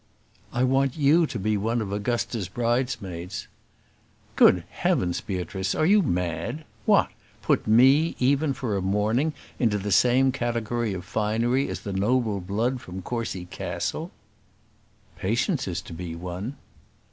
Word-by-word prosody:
"I 125 - 0
want 135 +2 +2
you 155 +3 +4
to 120 - -5
be 105 +1 0
one 115 +4 0
of 105 -3 -3
Augusta's 110 -1 -2
bridesmaids." 105 -6 -2 0.9
"Good - - +6
heavens, 90 -1 0
Beatrice! 95 0 -3
Are 155 - +2
you 205 +4 +5
mad? 100 - -2 0.2
What! - - +5 0.3
Put - - +1
me, 135 +9 +5
even 140 +3 +2
for 125 -6 -2
a 100 - -1
morning, 105 +10 +1 0.3
into 110 -4 +2
the 100 +1 -3
same 125 +6 +4
category 120 -3 -2
of 90 0 -7
finery 115 +7 0
as - - -4
the 100 - -5
noble 105 +1 +1
blood 110 +8 -1
from 90 +1 -8
Courcy 115 -6 -3
Castle!" 90 - -4 1.1
"Patience 120 - 0
is 90 -1 -3
to - - -9
be 85 0 -6
one." 90 +9 -5
115 Hz, 140 wpm, -25 LUFS, 95-130 Hz, 1.1 s, Good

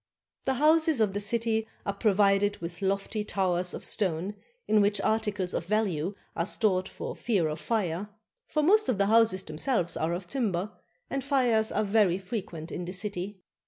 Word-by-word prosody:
The 265 - +1
houses 315 +1 +4
of 210 -3 +2
the 205 - -1
city 225 +1 0 0.2
are 200 - -1
provided 200 -1 +3
with 170 +2 -7
lofty 195 +2 -1
towers 180 -3 0
of - - -5
stone 185 -1 -1 0.3
in 215 -1 +4
which 205 0 +2
articles 210 -3 0
of 170 - -3
value 195 -4 0 0.2
are 170 - -1
stored 190 -4 +1
for - - -6
fear 200 -9 +1
of 155 0 -4
fire; 200 -3 -1 0.4
for 305 - 0
most 425 +4 +4
of 240 - +1
the 200 - +3
houses 215 -3 +3
themselves 170 - -1
are 160 +2 -1
of 180 +1 -4
timber, 205 -4 -1 0.4
and 275 -1 -1
fires 245 -6 +2
are - - +1
very 200 -3 +3
frequent 185 -5 -6
in 180 - -4
the 180 - -5
city. 195 0 -3
205 Hz, 175 wpm, -28 LUFS, 180-225 Hz, 0.4 s, houses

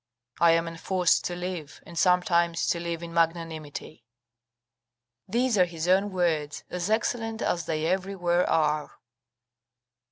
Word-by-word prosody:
I 170 -1 +6
am 165 0 +1
enforced 175 +2 +1
to 175 - -2
live, 175 -4 -6
and 170 - -11
sometimes 170 -1 +2
to 170 - +1
live 170 0 -4
in 170 0 -7
magnanimity." 160 -5 -2 1.2
These 235 +1 +1
are 180 - +6
his 170 -1 -5
own 195 +3 +3
words, 160 -5 -1
as 180 +2 -2
excellent 225 0 -1
as 170 -1 -1
they 155 -1 -1
everywhere 180 -1 0
are. 150 -1 0
170 Hz, 130 wpm, -27 LUFS, 165-185 Hz, 1.2 s, I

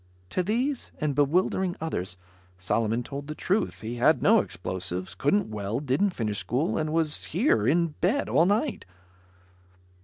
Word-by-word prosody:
To - - +1
these, 240 +8 -1
and 150 -2 0
bewildering 175 +5 +1
others, 95 - -4 0.4
Solomon 115 +6 0
told 140 +3 -7
the 150 - -5
truth. 200 +7 -1
He 115 +2 -5
had 150 +7 +3
no 225 +2 +6
explosives, 90 - -4
couldn't 145 - +1
weld, 105 +6 -3
didn't 145 +10 +2
finish 105 -3 -1
school 135 +8 -1
and 155 0 -1
was 160 -2 0
here, 165 - +2
in 170 +2 +3
bed, 225 +11 +1
all 170 - +3
night. 220 +6 0
150 Hz, 150 wpm, -27 LUFS, 110-185 Hz, 0.4 s, no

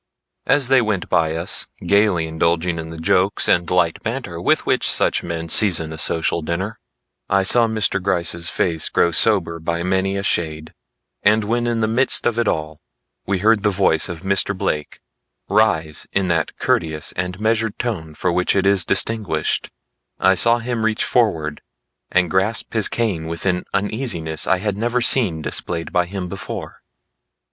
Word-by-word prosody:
As 135 -2 +3
they 135 -1 +5
went 105 -5 -2
by 80 -1 +1
us 85 - 0 0.2
gaily 100 -5 +2
indulging 85 +1 0
in 80 0 -6
the 80 - -8
jokes 90 +4 +1
and 85 -1 +2
light - - +1
banter - - -5
with - - +1
which - - +1
such - - +1
men 85 -1 -5
season 80 -4 +2
a 80 - -8
social 80 +1 +1
dinner, 95 +7 -4 0.5
I 100 0 +3
saw 115 +4 +3
Mr. 110 -3 -1
Gryce's 85 -3 -1
face 80 -3 -1
grow 85 - +2
sober 85 -3 +2
by 85 +1 -2
many 95 +2 0
a 100 - -3
shade; 80 -4 -2 0.5
and 110 +1 +3
when 120 +3 -1
in 115 -1 -1
the 110 - +2
midst 125 +4 +1
of 120 -1 +1
it 120 - +1
all, 75 -3 -2 0.5
we 100 - +1
heard 110 -1 +4
the 105 - +2
voice 95 -4 +2
of 85 -2 -6
Mr. 100 0 0
Blake 75 -4 -3 0.5
rise 80 -8 +1
in 95 -1 0
that 80 -2 -1
courteous 80 -2 -1
and 90 +1 -4
measured 110 0 0
tone 80 -10 -4
for 90 - -1
which 90 +2 +1
it 95 -1 +1
is 100 -2 +5
distinguished, 105 +1 0 0.5
I 95 - +4
saw 115 +5 +4
him 120 -1 -3
reach 110 -1 0
forward 80 - 0 0.5
and 90 -2 +1
grasp 95 +4 0
his 110 -3 +3
cane 100 -9 -2
with 85 +2 -5
an 90 -1 0
uneasiness 100 - -2
I 95 - +3
had 100 +1 -3
never 120 +3 0
seen 105 -10 +2
displayed 85 +1 -4
by 90 0 +2
him 95 -1 -5
before. - - -7
95 Hz, 170 wpm, -20 LUFS, 85-110 Hz, 0.5 s, they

